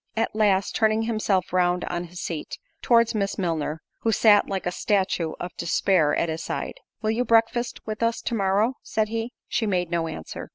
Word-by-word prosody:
At 225 - 0
last, 200 -3 +2
turning 220 0 +2
himself 215 -5 0
round 180 -1 +2
on 175 0 -3
his 175 +1 -10
seat, 160 -3 -5 0.2
towards 235 -1 +4
Miss 200 -2 -1
Milner, 160 -4 -2 0.2
who 225 - +1
sat 210 -1 +5
like 195 -1 -3
a 180 - 0
statue 185 -4 0
of 175 0 -6
despair 170 -2 +2
at 170 - +1
his 160 0 -3
side, - - -4 0.2
"Will 215 - +2
you 235 +3 +1
breakfast 235 +1 +1
with 215 0 -5
us 230 0 +1
to - - -2
morrow?" 205 +4 +1
said 215 -1 -1
he. 225 +1 -3 0.2
She 225 - 0
made 180 -3 0
no 170 -1 0
answer. 80 - -7
200 Hz, 195 wpm, -25 LUFS, 175-225 Hz, 0.2 s, sat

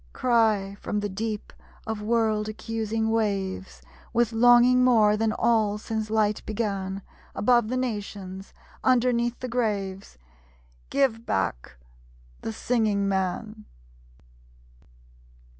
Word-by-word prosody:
Cry, 215 -5 +2
from 210 - -2
the 205 - -2
deep 215 +2 -4 0.3
of 220 -1 -4
world 215 -1 +1
accusing 220 0 -2
waves, 195 -4 -2 0.3
With 240 -1 +2
longing 245 +2 +5
more 220 -4 +5
than 220 0 +1
all 215 -2 +2
since 220 0 -4
Light 215 -1 +1
began, 195 -3 -3 0.3
Above 240 0 +3
the 255 +3 -2
nations, 200 -5 -5 0.3
underneath 240 -1 +2
the 255 - -3
graves, 200 - -2 0.7
'Give 265 -5 +1
back 95 - -2 0.7
the - - -4
Singing 210 - 0
Man!' 195 +3 -2
220 Hz, 105 wpm, -26 LUFS, 200-235 Hz, 0.7 s, longing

